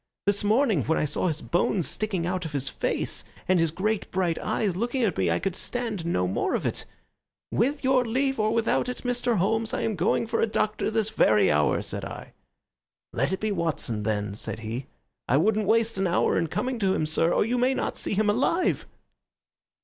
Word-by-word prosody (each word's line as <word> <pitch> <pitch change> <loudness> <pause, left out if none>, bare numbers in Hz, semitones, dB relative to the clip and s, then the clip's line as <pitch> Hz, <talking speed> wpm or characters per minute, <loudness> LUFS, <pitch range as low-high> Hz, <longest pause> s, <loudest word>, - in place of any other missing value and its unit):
This 200 +1 +2
morning 215 - +3
when 160 - +1
I - - +1
saw 150 +5 -1
his 160 -2 -2
bones 175 0 +1
sticking 195 -6 -1
out 180 +1 -1
of 160 -2 -6
his 140 -1 -1
face - - -2 0.2
and 185 -1 +4
his 165 -1 +2
great 200 +6 -2
bright 180 -3 0
eyes 200 -5 -1
looking 240 +6 -1
at 200 -7 +1
me 95 -2 +1
I 85 - +2
could 190 - -2
stand 225 -9 -3
no 90 - +1
more 95 - 0
of - - -2
it. - - -2 0.7
'With 280 +6 0
your 260 -1 +4
leave 265 +2 0
or 215 0 +2
without 230 +2 +1
it, 250 - -6
Mr. 245 -2 0
Holmes, 220 +4 0
I - - -2
am 220 - -1
going 180 +6 +1
for 230 0 -1
a - - +3
doctor 215 0 0
this 220 -1 0
very 105 - +4
hour,' 75 0 +2
said - - -5
I. - - -8 0.8
'Let 135 +8 0
it 190 - -1
be 215 0 -1
Watson, 160 - -1
then,' 105 -1 -1
said 110 +2 -5
he. 115 +4 -5 0.4
I 135 - +3
wouldn't 210 +5 +2
waste 225 -1 +2
an 190 - +2
hour 175 - +2
in 165 - +1
coming 250 - -2
to 190 -2 +2
him, 155 - 0
sir, 160 +2 +1
or - - +2
you 245 +2 0
may 255 +2 +2
not - - -2
see - - -2
him 215 +1 +2
alive." 275 - +1
200 Hz, 210 wpm, -26 LUFS, 160-225 Hz, 0.8 s, and